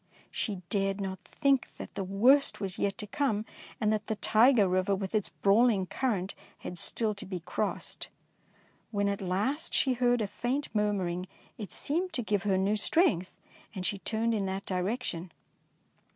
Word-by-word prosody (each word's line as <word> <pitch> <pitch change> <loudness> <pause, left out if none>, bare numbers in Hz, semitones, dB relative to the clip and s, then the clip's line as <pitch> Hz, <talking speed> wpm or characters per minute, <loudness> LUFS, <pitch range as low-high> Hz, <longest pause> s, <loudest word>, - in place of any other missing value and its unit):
She 195 -5 -3
dared 195 -1 +1
not 190 -1 -4
think 275 -2 +1
that - - -8
the 195 - -3
worst 240 +10 +4
was 190 -3 -3
yet 200 -1 0
to 210 - -5
come, 215 -1 -1 0.3
and 215 0 +2
that 215 -1 -2
the 220 - -1
Tyger 220 0 +5
Eiver 185 +2 +1
with 190 0 -4
its 215 -3 +1
brawling 205 -1 +3
current 200 -2 -1 0.2
had 175 - -4
still 220 +3 +1
to 200 - -7
be 185 -3 -4
crossed. 180 +5 -3 0.8
When 205 -2 0
at 200 0 -1
last 210 - 0
she 265 - +3
heard 245 -1 +2
a - - +1
faint 255 +8 -2
murmuring, 190 -4 0 0.3
it 205 -4 -6
seemed 345 +5 -1
to 245 - -1
give 205 -2 0
her 190 - +3
new 200 +3 +1
strength, 205 - +2 0.4
and 185 -1 -4
she 200 - -1
turned 230 +3 0
in 200 -3 0
that 190 +1 -3
direction. 185 -2 -2
205 Hz, 170 wpm, -30 LUFS, 190-235 Hz, 0.8 s, Tyger